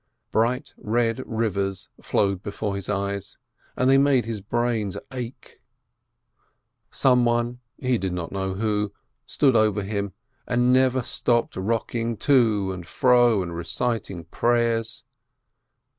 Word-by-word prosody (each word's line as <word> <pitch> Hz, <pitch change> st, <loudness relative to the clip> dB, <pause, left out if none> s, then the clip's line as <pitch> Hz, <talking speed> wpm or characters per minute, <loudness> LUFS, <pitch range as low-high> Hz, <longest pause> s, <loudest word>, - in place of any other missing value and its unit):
Bright 120 Hz, +4 st, 0 dB
red 115 Hz, +2 st, 0 dB
rivers 100 Hz, -5 st, -2 dB
flowed 100 Hz, -2 st, 0 dB
before 100 Hz, 0 st, -3 dB
his 100 Hz, -1 st, -6 dB
eyes, 100 Hz, 0 st, -3 dB, 0.4 s
and 125 Hz, -, +2 dB
they 135 Hz, +1 st, +6 dB
made 140 Hz, -4 st, +3 dB
his 115 Hz, -3 st, -4 dB
brains 115 Hz, -2 st, -1 dB, 0.2 s
ache. 125 Hz, -1 st, -8 dB, 1.3 s
Some 125 Hz, -2 st, +3 dB
one, 120 Hz, +1 st, 0 dB, 0.2 s
he 125 Hz, -3 st, 0 dB
did 95 Hz, -1 st, -2 dB
not 90 Hz, -2 st, -4 dB
know 95 Hz, -1 st, -2 dB
who, 105 Hz, -1 st, -1 dB, 0.3 s
stood 135 Hz, -4 st, +3 dB
over 105 Hz, -2 st, +3 dB
him, 100 Hz, -1 st, -3 dB, 0.3 s
and 125 Hz, +1 st, +3 dB
never 130 Hz, 0 st, +3 dB
stopped 120 Hz, 0 st, 0 dB
rock 110 Hz, +4 st, -2 dB
ing 115 Hz, -1 st, -1 dB
to 110 Hz, -9 st, +3 dB
and 90 Hz, -3 st, -7 dB
fro 120 Hz, -5 st, +4 dB
and 85 Hz, -1 st, -6 dB
reciting 85 Hz, +2 st, -2 dB
prayers. 115 Hz, -1 st, 0 dB
115 Hz, 130 wpm, -24 LUFS, 100-120 Hz, 1.3 s, they